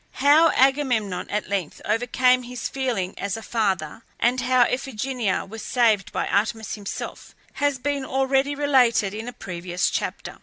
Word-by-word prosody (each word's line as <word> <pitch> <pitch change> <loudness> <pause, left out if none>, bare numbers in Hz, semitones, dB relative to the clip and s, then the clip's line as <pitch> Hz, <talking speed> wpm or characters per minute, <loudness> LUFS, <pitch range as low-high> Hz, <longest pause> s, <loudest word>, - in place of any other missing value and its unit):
How 295 +4 +5
Agamemnon 255 -8 +1
at 210 0 -2
length 190 -6 -3
overcame 250 +3 +2
his 245 -1 -5
feelings 235 -9 -2
as 200 +2 -2
a 225 - -8
father, 195 -7 -1 0.2
and 250 +2 +2
how 255 0 +3
Iphigenia 250 -4 -2
was 220 +2 -8
saved 225 -5 +2
by - - -1
Artemis 220 +1 -1
herself, 205 -2 -7 0.3
has 285 -2 +2
been 280 +1 -2
already 270 +2 +1
related 250 -8 +3
in 220 +2 -6
a - - -4
previous 175 -4 -3
chapter. - - -4
240 Hz, 150 wpm, -24 LUFS, 205-265 Hz, 0.3 s, How